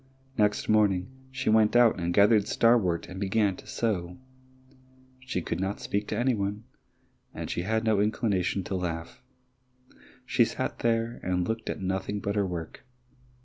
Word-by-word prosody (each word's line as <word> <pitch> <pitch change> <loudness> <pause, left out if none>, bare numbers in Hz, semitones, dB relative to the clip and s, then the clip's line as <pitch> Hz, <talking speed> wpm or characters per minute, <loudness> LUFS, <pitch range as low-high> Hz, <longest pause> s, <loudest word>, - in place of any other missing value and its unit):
Next 105 -2 +1
morning 105 -1 +2 0.2
she 130 -3 -1
went 110 0 +4
out 120 -5 +5
and 85 0 -1
gathered 105 +2 +4
starwort 110 -8 +2
and 90 +2 -8
began 100 0 +1
to - - -14
sew. 90 -6 -2 1.0
She 130 -9 -4
could - - -3
not 95 +2 -2
speak 105 +1 -2
to 105 - -3
any 125 +2 +2
one, 100 0 -3 0.7
and - - -5
she - - -2
had 110 +4 0
no 110 -2 +2
inclination 100 -3 0
to 95 - -4
laugh; 85 -2 -4 1.0
she - - +3
sat - - -3
there 115 0 0
and 90 -1 -1
looked 115 0 -3
at - - -4
nothing 95 +2 -2
but 100 +1 -3
her 100 -2 +1
work. 85 -3 -6
100 Hz, 160 wpm, -28 LUFS, 90-110 Hz, 1.0 s, out